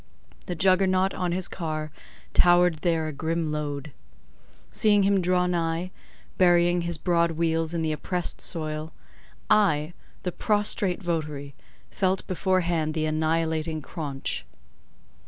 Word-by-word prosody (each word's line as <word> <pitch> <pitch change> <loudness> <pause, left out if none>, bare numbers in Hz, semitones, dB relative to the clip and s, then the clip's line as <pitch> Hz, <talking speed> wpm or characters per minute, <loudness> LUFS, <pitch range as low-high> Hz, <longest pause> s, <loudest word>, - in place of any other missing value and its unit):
The 180 - -3
juggernaut 185 +1 +3
on 180 -1 -2
his 180 +1 0
car 155 -3 -4 0.4
towered 175 -1 +5
there 165 -1 0
a 155 - -4
grim 160 +2 -2
load. 150 -1 -4 0.8
Seeing 205 -2 +3
him 195 -1 +3
draw 180 0 +2
nigh, 170 0 -1 0.5
burying 175 -1 +4
his 170 -1 -2
broad 170 0 +1
wheels 165 0 0
in 170 -1 -2
the 155 - 0
oppressed 175 +3 -2
soil—I, 155 +2 -1 0.3
the 180 - -1
prostrate 205 -2 0
votary—felt 160 +4 -3
beforehand 175 -4 0
the 155 -1 0
annihilating 160 0 0
craunch. 140 -4 -4
170 Hz, 115 wpm, -26 LUFS, 155-180 Hz, 0.8 s, towered